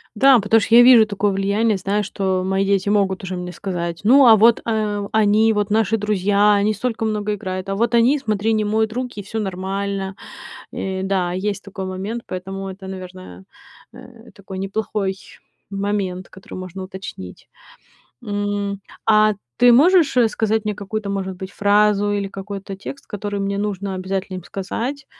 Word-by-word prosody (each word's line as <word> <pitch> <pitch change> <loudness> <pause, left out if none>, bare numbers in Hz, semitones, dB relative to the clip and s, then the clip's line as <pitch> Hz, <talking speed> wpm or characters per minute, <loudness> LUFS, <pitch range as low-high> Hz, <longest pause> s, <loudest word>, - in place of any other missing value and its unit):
Да, 265 +3 +6
потому 220 +2 +3
что 230 - +2
я 240 - +9
вижу 240 -4 +7
такое 205 0 0
влияние, 200 +3 +1
знаю, 200 +3 -1
что 190 -2 -1
мои 190 +1 +1
дети 195 0 +1
могут 195 -2 +1
уже 185 0 -4
мне 180 0 -5
сказать: 170 -3 -4
"Ну, 260 +5 +6
а 225 - +9
вот, 225 +2 +5
э, 210 -3 -1
они 220 +1 +3
вот, 210 -1 -1
наши 225 0 +2
друзья, 205 0 +2
они 205 +1 +2
столько 230 -2 -3
много 210 -1 -1
играют, 185 -1 -5
а 195 - -1
вот 235 +3 +1
они, 255 +5 +4
смотри, 215 -3 0
не 215 -1 +1
моют 220 +1 0
руки- 250 -4 -4
и - - -12
всё 220 +3 -5
нормально". 195 0 -3 0.6
Э, 190 0 -4
да, 190 -2 0
есть 200 +1 -3
такой 195 -1 -7
момент, 195 +5 -5
поэтому 195 +1 -6
это, 190 0 -10
наверное, 185 - -9 0.5
э, - - -14
такой 190 -1 -8
неплохой 195 0 -2 0.6
момент, 195 -2 -3
который 190 - -12
можно 185 +1 -7
уточнить. 185 - -9 0.8
М, 205 -1 -2 0.3
а 215 -1 +5 0.3
ты 245 -1 +7
можешь, 320 +2 +5
э, 240 -2 +5
сказать 220 0 -1
мне 210 -1 -1
какую-то, 205 0 -4
может 190 -1 -3
быть, 190 +1 -7
фразу 205 0 +2
или 200 -1 -2
какой-то 195 0 -7
текст, 275 +8 -9
который 205 -1 -4
мне 200 0 -2
нужно 200 -2 -3
обязательно 190 0 -4
им 175 - -12
сказать, 250 +8 -5
200 Hz, 170 wpm, -20 LUFS, 190-215 Hz, 0.8 s, я